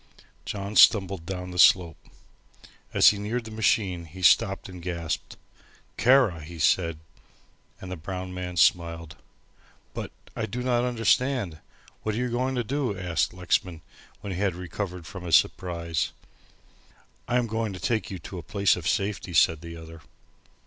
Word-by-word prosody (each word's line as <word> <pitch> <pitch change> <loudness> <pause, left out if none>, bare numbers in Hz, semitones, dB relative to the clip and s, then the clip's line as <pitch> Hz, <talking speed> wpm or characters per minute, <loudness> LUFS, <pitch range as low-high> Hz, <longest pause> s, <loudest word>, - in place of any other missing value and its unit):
John 100 +1 -5
stumbled 95 -7 +5
down 90 -1 -5
the 90 - -5
slope. 85 -1 +4 0.8
As - - +7
he 100 - -2
neared 110 +3 -3
the 110 - -8
machine 100 -5 0
he 90 +4 -11
stopped 95 +1 +4
and 90 -2 -10
gasped. 85 -2 -4 0.6
"Kara," 120 - +4
he 85 +3 -10
said, 85 0 +2 0.8
and 95 - -8
the - - -3
brown 90 +2 -6
man 90 -1 -5
smiled. 85 -2 +2 0.8
"But, - - -6 0.2
I - - -2
do 125 +5 -4
not 120 -1 +1
understand. 120 - +1 0.4
What 110 -1 -2
are - - -3
you 125 0 -1
going 130 +2 -1
to 120 - 0
do!" 130 -4 -2
asked 90 -2 0
Lexman, 90 -2 -1 0.4
when 100 -1 -5
he 90 - -5
had 100 -4 0
recovered 90 0 -5
from 95 +2 -9
his 85 -2 +3
surprise. 85 -3 0 1.1
"I 125 - +1
am 125 - +1
going 110 -1 -2
to 95 - -8
take 110 -4 -1
you 95 - -5
to 90 +2 -8
a - - -6
place 100 +1 +2
of 90 -1 -5
safety," 95 -3 -1
said 80 -1 +4
the 85 0 -8
other. 80 0 -11
95 Hz, 165 wpm, -26 LUFS, 85-110 Hz, 1.1 s, As